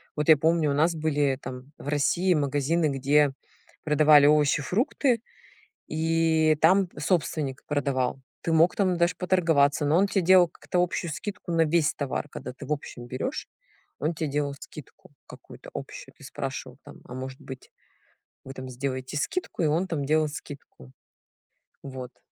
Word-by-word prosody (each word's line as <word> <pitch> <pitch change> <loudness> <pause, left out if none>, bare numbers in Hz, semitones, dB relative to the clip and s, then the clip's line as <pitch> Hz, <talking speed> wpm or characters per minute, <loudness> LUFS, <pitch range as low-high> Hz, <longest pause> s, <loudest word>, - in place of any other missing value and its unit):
вот 150 +1 -1
я 155 - +8
помню, 160 -1 +2
у - - +1
нас 160 +4 +2
были 145 -4 0
там 130 0 -9
в - - -11
России 170 +6 +2
магазины, 145 +2 +1
где 140 +1 +2 0.5
продавали 150 -1 +6
овощи, 145 -1 +3
фрукты, 235 - 0 0.7
и 160 -1 +2
там 185 +3 +4
собственник 150 -5 -1
продавал. 135 -3 -1 0.2
Ты 165 - -2
мог 165 +2 +4
там 185 -3 +1
даже 170 +1 +2
поторговаться, 160 -6 +2
но 150 - +2
он 195 +2 +3
тебе 195 -1 0
делал 180 -1 +6
как-то 180 0 -1
общую 170 -2 -3
скидку 195 +2 -6
на 165 0 +4
весь 155 -1 +2
товар. 140 0 -3
Когда - - -8
ты 135 - -10
в 150 - 0
общем 120 -4 -8
берёшь, 130 - -4 0.5
он 160 - -1
тебе 155 -2 -3
делал 145 0 -1
скидку - - -13
какую-то - - -13
общую. - - -8
Ты - - -16
спрашивал - - -6
там: - - -14
"А - - -10
может 130 +1 -7
быть 130 -1 -10 0.7
вы 135 - -8
там 130 0 -7
сделаете 130 +1 -4
скидку?" 170 - -2
И - - +3
он 165 +5 +1
там 150 -5 -2
делал 155 +1 +2
скидку. 140 - -11 0.9
Вот. 130 -2 -8
150 Hz, 160 wpm, -26 LUFS, 140-170 Hz, 0.9 s, я